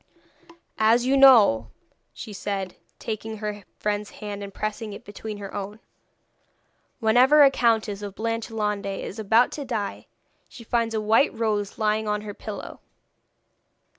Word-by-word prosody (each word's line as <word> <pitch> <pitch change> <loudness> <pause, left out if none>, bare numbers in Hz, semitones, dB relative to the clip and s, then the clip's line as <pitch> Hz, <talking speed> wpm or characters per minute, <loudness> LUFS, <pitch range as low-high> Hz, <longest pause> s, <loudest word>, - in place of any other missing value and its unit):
'As 230 +3 +4
you 265 +2 +3
know,' 225 - +6 0.4
she 215 - -9
said, 195 -2 -4 0.2
taking 220 0 -5
her 210 -1 -5 0.2
friend's 210 0 -2
hand 205 -1 -7
and 200 0 -7
pressing 215 +1 -4
it - - -11
between 210 +1 -7
her 200 -1 -8
own, 205 +1 -6 1.2
'whenever 255 +6 +6
a 275 - +6
Countess 220 -5 +1
of 200 -1 -7
Blanchelande 215 -3 -2
is 220 - -7
about 220 +3 +3
to 290 - -5
die 225 -6 -4 0.4
she 235 - -12
finds 230 0 -1
a - - +1
white 220 +6 +3
rose 210 -3 -1
lying 215 0 0
on 210 0 -1
her 210 -1 -7
pillow. 210 0 -8
215 Hz, 140 wpm, -25 LUFS, 205-230 Hz, 1.2 s, know